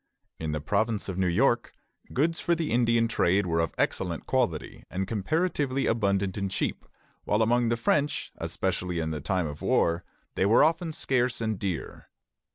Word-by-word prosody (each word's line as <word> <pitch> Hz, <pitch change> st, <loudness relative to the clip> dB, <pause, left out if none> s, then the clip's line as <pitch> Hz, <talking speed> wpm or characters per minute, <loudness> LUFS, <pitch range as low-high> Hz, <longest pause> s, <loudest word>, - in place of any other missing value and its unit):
In 80 Hz, -1 st, -2 dB
the 75 Hz, -, -1 dB
province 105 Hz, +7 st, 0 dB
of 95 Hz, 0 st, -3 dB
New 95 Hz, -, +2 dB
York, 120 Hz, +6 st, +2 dB, 0.4 s
goods 160 Hz, +5 st, +1 dB
for 170 Hz, -, +2 dB
the 165 Hz, -2 st, -2 dB
Indian 115 Hz, -1 st, +3 dB
trade 100 Hz, -3 st, +2 dB
were 85 Hz, -1 st, 0 dB
of 80 Hz, -, -1 dB
excellent 85 Hz, -3 st, -1 dB
quality 120 Hz, -12 st, -1 dB
and 95 Hz, +1 st, -3 dB
comparatively 135 Hz, -, 0 dB
abundant 100 Hz, -4 st, +1 dB
and 100 Hz, -1 st, -1 dB
cheap; -, -, -2 dB, 0.4 s
while 105 Hz, +2 st, +2 dB
among 120 Hz, +1 st, +2 dB
the 115 Hz, -, +1 dB
French, 145 Hz, +5 st, 0 dB
especially 90 Hz, -2 st, -2 dB
in 80 Hz, -1 st, -2 dB
time 90 Hz, +2 st, 0 dB
of 75 Hz, -1 st, -6 dB
war, 85 Hz, +2 st, +2 dB, 0.3 s
they 95 Hz, -, +1 dB
were 110 Hz, +7 st, +6 dB
often 165 Hz, +1 st, +1 dB
scarce 125 Hz, -4 st, 0 dB
and 110 Hz, -4 st, -2 dB
dear. 95 Hz, -5 st, -4 dB
110 Hz, 165 wpm, -27 LUFS, 90-125 Hz, 0.4 s, were